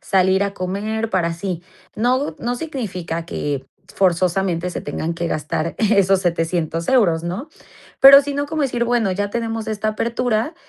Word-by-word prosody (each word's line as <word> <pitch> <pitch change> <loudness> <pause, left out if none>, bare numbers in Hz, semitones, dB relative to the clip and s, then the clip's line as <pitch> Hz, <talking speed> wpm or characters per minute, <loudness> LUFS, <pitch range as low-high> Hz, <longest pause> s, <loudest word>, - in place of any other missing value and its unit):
salir 190 +1 +2
a 200 0 -4
comer, 215 +5 -3
para 175 -3 +1
así". 170 0 -4 0.3
No, 255 +6 +1
no 240 +1 -2
significa 185 - -4
que 140 -5 -3 0.3
forzosamente 180 -1 +1
se - - -5
tengan 160 +3 -3
que 170 +1 -3
gastar 155 +2 -2
esos 195 -3 +3
€700 165 -1 -1
euros, 175 -11 +3
¿no? 200 - -4 0.5
Pero 275 +1 +10
si 285 0 -4
no 285 0 -1
como 310 0 -2
decir: 240 -3 0
"Bueno, 235 -4 +1
ya 205 +2 -2
tenemos 225 -1 -3
esta 215 0 -2
apertura, 235 +5 -1
195 Hz, 155 wpm, -20 LUFS, 170-235 Hz, 0.5 s, Pero